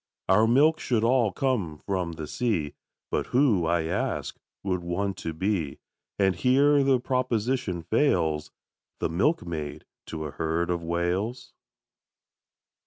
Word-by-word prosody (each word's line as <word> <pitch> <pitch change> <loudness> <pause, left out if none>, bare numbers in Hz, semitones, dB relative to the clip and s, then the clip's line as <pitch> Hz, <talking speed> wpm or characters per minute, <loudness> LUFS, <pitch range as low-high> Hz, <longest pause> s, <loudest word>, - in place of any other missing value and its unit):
Our 105 +4 +5
milk 150 +7 +4
should 115 -3 0
all 120 -3 +3
come 110 - -1
from 90 -4 -2
the 80 -1 -6
sea, 85 -5 -1 0.4
But - - -1
who, 120 - +3
I 85 -1 +2
ask, 80 - -2 0.3
would 90 -2 -1
want 95 +3 -2
to 80 - -4
be, 80 -4 -2 0.4
And 95 -2 +2
here 140 - +4
the 135 -2 +3
proposition 120 -7 -1
fails, 80 - +1 0.5
The - - 0
milkmaid 80 - -1 0.2
to 80 -1 -5
a 75 - -5
herd 80 +4 -1
of 85 -1 -1
Whales? 90 +9 -2
95 Hz, 130 wpm, -26 LUFS, 85-125 Hz, 0.5 s, Our